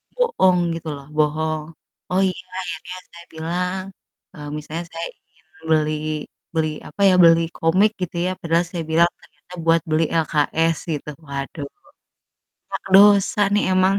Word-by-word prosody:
bohong 465 - +3 0.2
gitu 165 0 -7
loh, 140 -1 -11
bohong. 155 +1 0 0.5
Oh 185 +1 +2
iya 180 0 -7 0.2
akhirnya 180 0 -6 0.2
saya 170 0 -12
bilang, 180 +4 -2 0.5
eee, 150 -1 -9
misalnya 155 +3 -5
saya 165 +1 -4 0.2
ingin 160 - -33 0.3
beli 155 -1 +2 0.6
beli 160 -1 +1 0.2
apa 200 - -8
ya, - - +4
beli 165 0 +7 0.2
komik 185 +6 +3
gitu 180 -1 -4
ya, - - +1
padahal 170 0 +1
saya 170 -3 -3
bilang 170 +2 +5
ternyata 180 - -19
buat 165 0 +4
beli 155 +1 +2 0.2
LKS 160 +2 +1 0.2
gitu, 150 0 -5 0.2
waduh 140 +1 -5 1.0
banyak - - -4
dosa 200 0 +6
nih 205 - +3
emang. 185 +1 +4
165 Hz, 145 wpm, -21 LUFS, 155-180 Hz, 1.0 s, beli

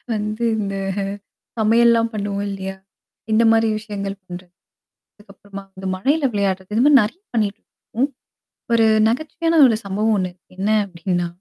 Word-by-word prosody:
வந்து 215 +2 -3
இந்த 195 -2 -3 0.8
சமையல்லாம் 230 +1 +4
பண்ணுவோம் 205 -1 -3
இல்லையா? 195 -1 -5 0.6
இந்த 220 +2 +4
மாதிரி 225 0 +3
விஷயங்கள் 200 -2 -5
பண்ணுறது, 180 0 -10 0.6
அதுக்கப்புறமா 200 -1 -12
வந்து 190 0 -8
மழையில 285 +10 +1
விளையாடுறது 195 -1 -2
இந்த 230 - +3
மாதிரி 295 - +6
நிறைய 225 - -5
பண்ணிட்டு 210 -3 0
இருப்போம். 255 +5 -4 0.7
ஒரு 230 -1 +4 0.2
நகைச்சுவையான 315 +6 0
ஒரு 230 - +2
சம்பவம் 210 +3 0
ஒண்ணு 185 -2 -2 0.2
என்ன? 195 +3 -2 0.2
அப்படின்னா, 175 -1 -2
210 Hz, 130 wpm, -20 LUFS, 195-230 Hz, 0.8 s, மாதிரி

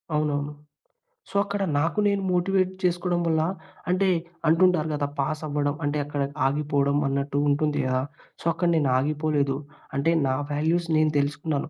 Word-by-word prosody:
అవునవును. 145 -1 0 0.8
సో, - - -15
అక్కడ 200 0 -2 0.2
నాకు 165 +7 0
నేను 200 -1 +1
మోటివేట్ 185 +1 +2
చేసుకోవడం 175 0 +1
వల్ల, 160 -1 +2 0.5
అంటే 185 +2 +2 0.4
అంటుంటారు 165 -1 +4
కదా, 145 -1 -1
పాస్ 155 +3 -1
అవ్వడం 145 0 0
అంటే 145 +1 0
అక్కడ 145 -1 -3 0.2
ఆగిపోవడం 140 0 +1
అన్నట్టు 140 +1 -1
ఉంటుంది 150 +1 +1
కదా! 130 0 +1 0.4
సో, - - -13
అక్కడ 175 +2 0
నేను 145 -4 +2
ఆగిపోలేదు. 145 0 0 0.4
అంటే 140 +4 +2 0.2
నా 130 - +1 0.2
వాల్యూస్ 160 +4 +1
నేను 155 0 +3
తెలుసుకున్నాను. 145 +1 -2
150 Hz, 145 wpm, -25 LUFS, 145-175 Hz, 0.8 s, అంటుంటారు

